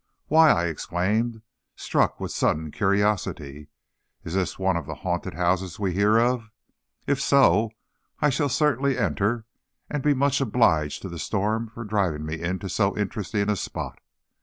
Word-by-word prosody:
"Why," 160 +1 +7
I 85 -10 +3
exclaimed, 105 +8 -1 0.3
struck - - 0
with - - -4
sudden 75 0 0
curiosity, 95 -8 -1 0.6
"is 85 - -6
this 95 -1 -1
one 95 -1 +1
of 80 -4 -3
the 80 - -5
haunted 90 -1 -2
houses 90 +1 0
we 95 -3 -1
hear 105 +4 +3
of? 120 -1 +1 0.6
If 140 -1 0
so, 115 -7 +4 0.5
I 150 - +3
shall 145 +2 0
certainly 140 -1 +1
enter, 110 -1 0 0.5
and 150 - -1
be 145 +1 +3
much 140 +1 +2
obliged 80 - +2
to 95 - -5
the 85 -1 -7
storm 110 +5 -1
for 115 +1 -9
driving 95 -8 -1
me 80 +1 -5
into 95 +3 -3
so 100 +2 0
interesting 105 0 -2
a 105 - +2
spot." - - -5
100 Hz, 160 wpm, -25 LUFS, 90-120 Hz, 0.6 s, Why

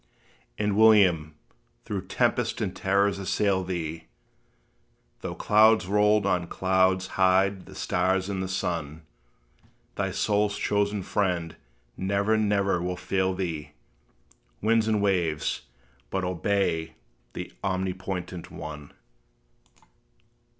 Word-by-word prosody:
And, 105 -1 0
William, 95 -8 +5 0.5
though - - -3
tempest - - 0
and - - -2
terrors 100 +1 +1
assail 95 0 +1
thee 80 -3 -4 1.1
Though - - -5
clouds 110 -1 +4
rolled 105 +1 +3
on 90 -3 +1
clouds 95 0 +2 0.2
hide 95 0 +3
the - - -12
stars 95 +1 0
and 100 -2 -3
the 95 - -2
sun, 85 -4 -3 0.9
Thy - - -1
soul's 105 0 0
chosen 105 -1 0
Friend 90 -5 -1 0.4
never, 100 +3 +1
never 100 -4 +1
will 90 0 -3
fail 95 0 0
thee! 85 -5 -4 0.9
Winds 110 +1 +2
and 105 -2 +1
waves 85 -10 0 0.4
but 95 - -2
obey 90 -2 -1 0.4
that - - -7
omnipotent 95 -2 -3
ONE. 75 -2 -8
95 Hz, 105 wpm, -26 LUFS, 90-100 Hz, 1.1 s, William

